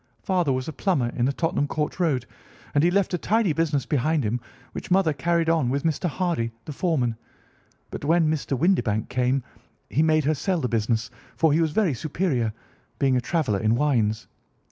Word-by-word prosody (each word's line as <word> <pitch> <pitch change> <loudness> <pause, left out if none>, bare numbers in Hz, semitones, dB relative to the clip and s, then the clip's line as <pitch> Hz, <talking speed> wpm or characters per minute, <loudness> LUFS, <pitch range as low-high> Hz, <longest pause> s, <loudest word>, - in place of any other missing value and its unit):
Father 180 -6 +1
was 130 0 -2
a 160 - -4
plumber 145 -7 0
in 120 0 -1
the 135 - +2
Tottenham 145 -1 0
Court 150 +3 -3
Road, 150 -8 +1 0.5
and 145 - +3
he 175 - +5
left 195 +1 +1
a 180 - 0
tidy 215 -4 +2
business 150 -4 0
behind 150 +2 +1
him, 115 +3 -1 0.3
which - - -7
mother 180 -4 +3
carried 165 +3 0
on 165 -6 +2
with 140 +2 -1
Mr. 165 +2 0
Hardy, 165 -10 -1
the 150 - -6
foreman; 135 -8 0 0.8
but - - -6
when 165 +2 +3
Mr. 150 -3 -1
Windibank 125 - +1
came 125 +1 +1 0.5
he 150 - +2
made 155 -1 +3
her 155 - +3
sell 175 +5 -1
the 125 - -1
business, 115 0 -1 0.3
for 160 -3 +3
he 160 - +3
was 160 - +2
very 185 -1 +1
superior, 135 - -1 0.5
being 135 -2 +2
a 125 - +2
traveller 130 - 0
in 110 +2 +2
wines. 120 -6 +1
150 Hz, 190 wpm, -24 LUFS, 125-165 Hz, 0.8 s, he